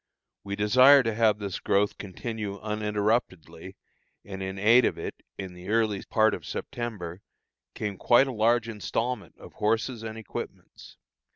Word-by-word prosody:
We 100 0 -4
desire 130 +7 +6
to 115 -1 -1
have 110 -1 +3
this 100 -3 -5
growth 100 +1 +1
continue 105 +1 -5
uninterruptedly, 105 -4 -2 0.5
and 95 -1 -7
in 95 0 -4
aid 115 +6 +5
of - - 0
it, - - -7 0.2
in 95 -2 -6
the 90 +2 -10
early 110 -2 +1
part 110 -1 +2
of - - -5
September, 100 -7 -6 0.5
came 100 -2 -4
quite 120 +3 +5
a 135 - -4
large 115 +1 +2
installment 115 +3 -3
of - - -13
horses 115 +3 -1
and 110 0 -6
equipments. 110 - -9
105 Hz, 150 wpm, -27 LUFS, 100-115 Hz, 0.5 s, desire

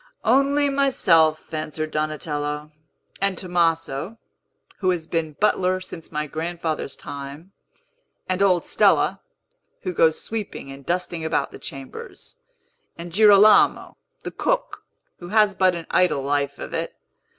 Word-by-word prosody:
"Only 275 +4 +3
myself," 175 - +2
answered 155 0 -3
Donatello, 150 -1 -3 0.5
"and 195 -2 +2
Tomaso, 165 0 -1 0.6
who 185 - +1
has 175 -3 -1
been 160 -2 -2
butler 185 +1 +1
since 170 -3 -10
my 150 -1 -2
grandfather's 160 -1 -4
time, 145 +5 -9 0.8
and 185 +1 -1
old 185 -3 +3
Stella, - - +2 0.6
who 185 -2 -3
goes 160 -1 +3
sweeping 210 -10 -5
and 135 0 -11
dusting 175 0 -2
about 160 0 -1
the - - -11
chambers, 135 -1 -9 0.6
and 170 0 -8
Girolamo, 210 +1 +5 0.3
the - - -5
cook, - - -2 0.4
who 175 - -9
has 210 +1 +3
but 185 -1 +2
an 170 -1 -6
idle 180 -7 +2
life 140 0 -1
of - - -8
it. - - -3
170 Hz, 130 wpm, -23 LUFS, 155-190 Hz, 0.8 s, Girolamo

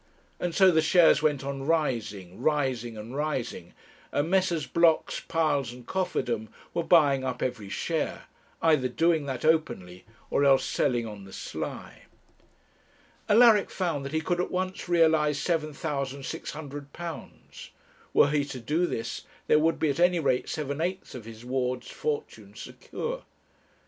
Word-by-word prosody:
And 175 -2 -2
so 190 -2 +6
the 160 -2 +4
shares 160 -2 +5
went 145 -3 +1
on 135 0 -4
rising, 115 - -1
rising, 130 -6 0
and 110 +5 -8
rising, 130 - -3 0.4
and 150 +4 0
Messrs. 185 -5 +2
Blocks, 170 -1 +2
Piles, 145 -6 0
and 125 0 -12
Cofferdam 125 - -2 0.2
were 170 - 0
buying 145 -6 +4
up 125 -1 -3
every 110 -6 -3
share; - - -2 0.4
either 155 -6 +4
doing 160 +4 +1
that 130 +1 -3
openly 95 - 0 0.3
or 140 - +2
else 135 -1 +5
selling 120 -2 0
on 105 -3 -8
the 95 - -13
sly. - - -7 1.2
Alaric 220 -1 +6
found 165 -7 -2
that 140 - -5
he 160 0 0
could 175 +2 0
at - - -3
once 185 0 -3
realize 160 -4 +3
£7,600. 145 0 -5 0.4
Were - - +5
he 150 -1 +2
to 135 -2 -7
do 155 +9 0
this, 115 - -4 0.2
there 150 - +4
would 160 +1 +2
be 155 - +1
at 140 - -5
any 175 0 +4
rate 130 -5 0
seven 145 0 -3
eighths 185 +3 -3
of 120 -4 -8
his 115 +1 -11
ward's 125 -1 -2
fortune 450 -1 -4
secure. - - -6
150 Hz, 145 wpm, -27 LUFS, 130-165 Hz, 1.2 s, so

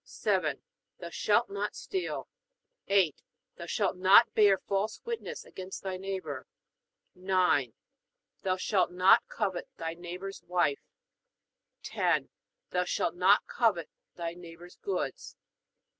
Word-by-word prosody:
7. - - -1 0.4
Thou - - -7
shalt - - +2
not 410 - -3
steal. 380 -2 -4 0.6
8. 190 -7 +3 0.4
Thou 170 - -7
shalt 195 +1 0
not 195 +5 +6
bear 205 -3 +5
false 200 +3 -2
witness 465 -1 -5
against 185 0 -8
thy 190 -1 -3
neighbor. 185 -8 -5 0.7
9. 180 - +2 0.7
Thou 185 -1 0
shalt 185 -1 +1
not 180 +2 +5
covet 190 -5 -2
thy 165 0 -3
neighbor's 180 +3 -7
wife. 175 -5 +1 1.0
10. - - 0 0.4
Thou 180 0 +1
shalt 175 -1 -1
not 185 +3 +4
covet 205 -9 0 0.2
thy 170 -1 -4
neighbor's 175 0 -12
goods. 400 - -4
185 Hz, 115 wpm, -30 LUFS, 175-195 Hz, 1.0 s, not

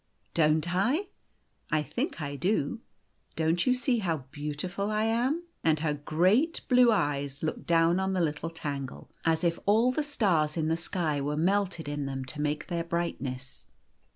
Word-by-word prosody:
" - - -42
Don't 155 +3 +2
I? 260 - +1 0.6
I 155 0 +2
think 245 - -3
I 145 0 -4
do. 180 - 0 0.5
Don't 165 +4 +1
you 255 - +5
see 250 -1 +1
how 165 -9 -2
beau 150 +1 -3
tiful 185 +7 -3
I 215 0 +1
am? 245 +9 +1
" - - -45
And 155 -2 +3
her 155 -2 +1
great 185 - +2
blue 250 -2 +6
eyes 145 -7 -1
looked 155 - -3
down 170 +1 +4
on 190 0 0
the 185 - 0
little 160 -1 -1
Tangle, 140 -5 -6
as 160 0 +2
if 170 -1 +1
all 225 +5 +5
the 280 - 0
stars 185 - +1
in 160 -1 0
the 165 - +2
sky 165 -3 -1
were 145 +2 -1
melted 185 -1 +1
in 145 -1 -3
them 135 -1 -4
to 150 - -5
make 150 0 -1
their 170 -2 -2
brightness. 140 -7 -4
165 Hz, 180 wpm, -29 LUFS, 150-205 Hz, 0.6 s, blue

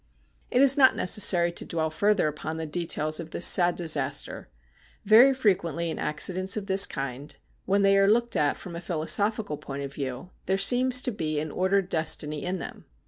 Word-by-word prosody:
It 255 - +2
is 275 +1 +6
not 260 -1 +5
necessary 180 -2 +2
to 170 - -6
dwell 160 -1 -4
further 205 +1 0
upon 155 +1 -6
the 160 - -5
details 155 -1 -1
of 165 -1 -8
this 170 - +1
sad 175 -1 +4
disaster. 145 - -1 0.6
Very 230 +6 +6
frequently 170 - -2
in - - -7
accidents 185 +6 0
of 205 - -5
this 195 0 +6
kind, 135 +1 -7 0.3
when 200 +1 0
they 195 0 +3
are 195 0 +2
looked 235 +2 0
at 145 -1 -1
from 180 -3 -11
a 170 - -7
philosophical 175 +3 -1
point 140 0 -8
of 140 0 -8
view, 135 +5 -7 0.2
there 190 +1 0
seems 250 +5 +3
to 250 - -3
be 155 -7 -4
an 155 0 -6
ordered 190 0 -1
destiny 155 -3 -2
in 185 +1 -4
them. - - -10
175 Hz, 190 wpm, -25 LUFS, 155-200 Hz, 0.6 s, is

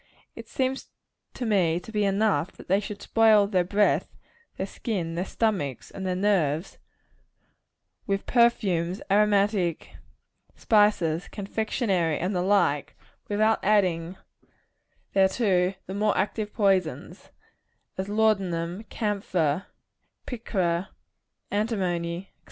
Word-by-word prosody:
It - - -10
seems 265 0 -2 0.5
to 250 - -4
me 180 -6 +2
to 180 - -12
be 210 -2 +1
enough, 200 -2 +1
that - - -14
they 195 +2 +3
should 205 0 -7
spoil 220 -2 +5
their 190 -3 +1
breath, 200 +3 +1 0.4
their - - -2
skin, 180 -8 -4
their 175 +3 -2
stomachs 190 - -2
and 190 -1 -5
their 180 - 0
nerves, 180 -4 0 1.3
with 195 0 -1
perfumes, 195 -7 +2
aromatic 200 -4 +2
seeds - - -22 0.6
and - - -29
spices, 200 -6 +2
confectionary, 200 - -1
and 185 +3 -2
the 180 - +1
like, 180 -7 +1 0.3
without 215 +2 +2
adding 185 -4 +1 1.0
thereto 190 -1 +2
the 190 - -6
more 210 +1 +1
active 210 +2 -1
poisons 195 -6 0 0.7
as 190 +1 -4
laudanum, 195 -3 0
camphor, 195 -7 -1 0.6
picra, 190 -7 -2 0.6
antimony, 185 -4 -2
&c. - - -43
195 Hz, 115 wpm, -26 LUFS, 175-210 Hz, 1.3 s, spoil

